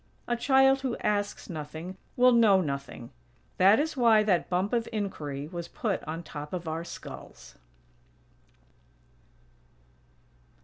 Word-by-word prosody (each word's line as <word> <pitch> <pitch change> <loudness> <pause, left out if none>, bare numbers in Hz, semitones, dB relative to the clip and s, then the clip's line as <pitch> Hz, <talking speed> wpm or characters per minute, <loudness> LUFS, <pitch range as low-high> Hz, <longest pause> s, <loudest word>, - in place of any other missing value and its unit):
A 240 - +1
child 270 +2 +4
who 260 -3 -2
asks 205 -1 -2
nothing 160 +2 -7 0.2
will 250 0 +6
know 220 -5 +5
nothing. 140 -7 -5 0.5
That 195 +4 +6
is 310 +1 -1
why 230 -4 +5
that 190 -5 +1
"bump 185 +5 0
of 235 -1 0
inquiry" 150 -10 -4
was 170 0 -6
put 210 -4 -3
on 160 +2 -5
top 150 0 -8
of 175 -2 -4
our 160 +1 -3
skulls. - - -10
190 Hz, 125 wpm, -28 LUFS, 160-235 Hz, 0.5 s, will